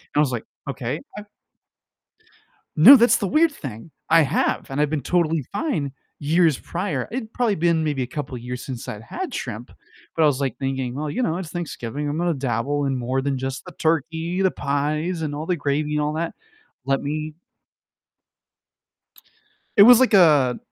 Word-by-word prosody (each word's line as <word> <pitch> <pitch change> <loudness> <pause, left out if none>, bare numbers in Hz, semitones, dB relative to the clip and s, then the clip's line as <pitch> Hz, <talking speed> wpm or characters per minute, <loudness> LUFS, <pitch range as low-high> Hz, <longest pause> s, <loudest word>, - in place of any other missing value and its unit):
I - - +3
was 150 -3 +3
like, 120 -3 -4 0.2
"Okay, 135 +1 -3 0.2
I've" 210 - -7 1.5
No, 280 - +10
that's 240 0 +5
the 205 - -2
weird 310 - +3
thing, 130 - -9 0.2
I 165 +1 +7
have, 145 +1 0
and 135 +2 -2
I've 150 -1 +1
been 155 -2 -1
totally 165 +1 0
fine 200 - -2 0.3
years 160 0 +2
prior. 180 +4 -3
It'd 225 -1 -5
probably 240 -4 +1
been 170 -2 +1
maybe 145 -4 -1
a - - -2
couple 130 0 -6
years 125 +1 -6
since 125 -3 -6
I'd 105 - -6
had 365 - -6
shrimp, - - -6 0.4
but, 165 - +1
I - - +6
was, 140 -2 +1
like, 135 - -2
thinking, 135 -2 -3
"Well, 150 +2 -3
you 255 - -2
know, 170 -6 0
it's 180 -4 -6
Thanksgiving, 150 -5 -5
I'm 145 +2 -2
gonna 175 -1 0
dabble 135 +2 -1
in 135 -1 -1
more 130 +2 -1
than 140 -1 -1
just 135 +1 -5
the - - -10
turkey, 165 +3 -1
the 190 - +3
pies, 155 +5 -2
and 150 -2 -3
all 150 +2 -5
the 180 - 0
gravy, 150 0 -1
and 150 - +1
all 150 0 -1
that. 165 +1 -3 0.5
Let 135 0 0
me" 155 +1 -4 2.4
It 200 - +9
was 245 +3 +9
like 255 -4 +3
a 150 -9 +5
150 Hz, 185 wpm, -22 LUFS, 135-175 Hz, 2.4 s, No